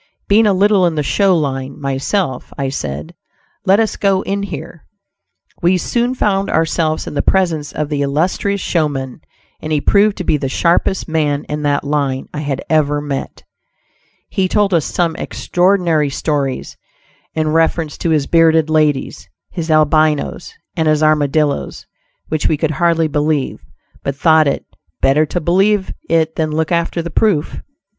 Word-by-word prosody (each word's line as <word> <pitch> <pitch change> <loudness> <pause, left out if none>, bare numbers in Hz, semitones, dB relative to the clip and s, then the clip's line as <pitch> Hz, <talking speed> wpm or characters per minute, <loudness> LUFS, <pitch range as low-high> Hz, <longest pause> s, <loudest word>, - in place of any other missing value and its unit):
Being 215 +2 +4
a 200 - +3
little 195 -1 +3
in 165 - -2
the 150 - 0
"show 190 +4 +2
line" 135 -3 -3
myself, 140 +2 -2
I 135 -1 -1
said 75 - -5 0.5
"let 195 +3 +5
us 220 -1 0
go 195 -1 +1
in 200 0 -2
here." 165 -4 -7 0.8
We 180 +1 +3
soon 240 +7 -1
found 195 -4 0
ourselves 160 -1 0
in - - -6
the 145 - 0
presence 165 -6 0
of 150 -1 -3
the 145 -2 -1
illustrious 175 +8 0
showman, 145 -7 -2 0.4
and 155 - -5
he 150 - +2
proved 205 +6 +3
to 185 - -3
be 155 - +1
the 135 -2 -3
sharpest 175 +5 +1
man 150 -3 0
in 150 0 -5
that 145 -1 0
line 140 -2 -2
I 150 - -4
had 140 -3 -3
ever 145 -2 +2
met. 145 -2 -5 0.8
He 190 -1 0
told 205 0 +1
us 165 -3 +2
some 170 -2 -1
extraordinary 175 -5 +1
stories 140 -2 -2 0.6
in 155 -1 0
reference 160 -1 +1
to 170 - -1
his 155 -3 +2
bearded 160 -1 +3
ladies, 150 -3 0 0.2
his 170 -2 -5
Albinos, 155 - +2 0.2
and 160 -3 0
his 155 0 +2
Armadillos, 150 -1 +1 0.4
which 155 - -1
we 155 - +1
could 155 +1 -1
hardly 165 +1 +1
believe, 150 -1 -1 0.4
but 140 - -3
thought 155 +1 +4
it 140 - -1 0.3
"better 150 +3 +3
to 175 - -2
believe 190 +4 +1 0.2
it 160 -1 +1
than 155 -1 0
look 155 +1 -1
after 170 0 0
the 170 - -6
proof'." 185 -5 0
155 Hz, 160 wpm, -17 LUFS, 145-175 Hz, 0.8 s, let